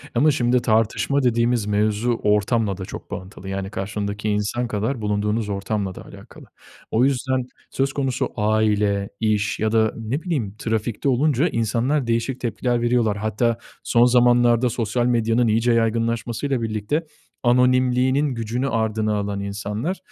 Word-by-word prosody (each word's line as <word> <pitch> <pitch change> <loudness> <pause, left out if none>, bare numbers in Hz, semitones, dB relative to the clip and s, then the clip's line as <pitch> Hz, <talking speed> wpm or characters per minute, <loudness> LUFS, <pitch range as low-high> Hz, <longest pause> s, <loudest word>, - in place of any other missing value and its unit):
ama 150 +6 +4
şimdi 125 -2 +2
tartışma 115 +5 +1
dediğimiz 120 -2 +2
mevzu, 105 +3 0
ortamla 105 -1 +1
da 95 - -6
çok - - -9
bağlantılı. 95 0 -7
Yani, 95 0 -3
karşındaki 105 +1 -3
insan 105 +4 -1
kadar, 110 +3 -2
bulunduğunuz 105 +1 -1
ortamla 100 -1 -2
da - - -10
alakalı. - - -13 0.5
O 115 +3 +3
yüzden, 130 -1 0 0.2
söz 135 0 0
konusu 135 -2 -1
aile, 105 -2 +1
iş 110 -1 0
ya 110 0 0
da 110 -1 +2
ne 115 +7 -3
bileyim 135 - -2
trafikte 110 +4 -1
olunca, 140 +3 +2
insanlar 120 +5 0
değişik 115 +3 -1
tepkiler 120 +1 -1
veriyorlar. 120 -3 +1
Hatta 110 +2 0 0.3
son 120 0 +4
zamanlarda 120 0 +4
sosyal 115 +1 -1
medyanın 115 0 +2
iyice 115 +2 +2
yaygınlaşmasıyla 115 +3 0
birlikte, 110 +8 -2 0.4
anonimliğinin 125 +2 +3
gücünü 120 +4 -2
ardına 110 -2 0
alan 100 -1 -3
insanlar 105 - -3
115 Hz, 135 wpm, -22 LUFS, 105-125 Hz, 0.5 s, ama